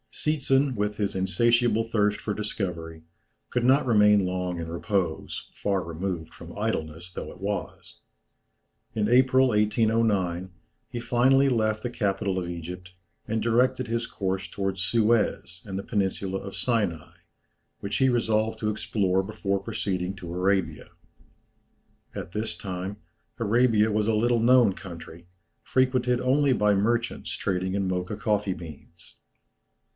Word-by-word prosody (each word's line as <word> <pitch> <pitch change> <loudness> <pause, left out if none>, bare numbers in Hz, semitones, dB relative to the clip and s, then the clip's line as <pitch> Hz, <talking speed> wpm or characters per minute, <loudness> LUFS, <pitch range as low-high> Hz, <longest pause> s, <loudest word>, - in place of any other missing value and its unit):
Seetzen, 140 -3 +1
with 105 -1 -1
his 100 -2 -1
insatiable 115 +3 +2
thirst 105 -2 +1
for 105 - -3
discovery, 85 -6 -4 0.5
could 125 - -1
not 130 +3 +4
remain 105 -4 +5
long 90 -1 -2
in 80 - -4
repose, 85 0 -2
far 100 -2 -1
removed 85 -1 -4
from 85 +2 -11
idleness 85 -5 -3
though - - -6
it - - -14
was. 100 +1 -5 0.9
In 105 -2 0
April, 130 +2 +5
1809, 105 -4 +1 0.4
he 120 - -5
finally 130 +3 +3
left 110 -3 +1
the 125 - -3
capital 100 -4 -1
of 90 -1 -4
Egypt, 90 +2 -7 0.4
and 110 0 -1
directed 125 +2 +2
his 115 +1 -1
course 95 0 -3
towards 95 -2 -3
Suez 100 -3 +1
and 95 -2 -5
the 100 - -4
peninsula 95 -2 -1
of 100 0 -8
Sinai, 100 -10 -1 0.6
which 100 0 -3
he 130 -1 +4
resolved 110 -2 +1
to 105 - 0
explore 95 -3 0
before 100 -1 -2
proceeding 95 -3 -3
to 85 -3 -8
Arabia. 95 +1 0 1.2
At - - -6
this 105 -3 -3
time 95 +2 -5 0.4
Arabia 115 -1 +3
was 105 0 +1
a 110 - +2
little 120 +2 +2
known 120 -3 +5
country, 85 -2 -10 0.4
frequented 125 -1 +2
only 135 +1 +3
by 105 -3 +3
merchants 115 +4 0
trading 95 0 -2
in 100 -1 0
Mocha 90 +2 -2
coffee 105 -3 0
beans. 85 +1 -12
105 Hz, 135 wpm, -26 LUFS, 95-115 Hz, 1.2 s, remain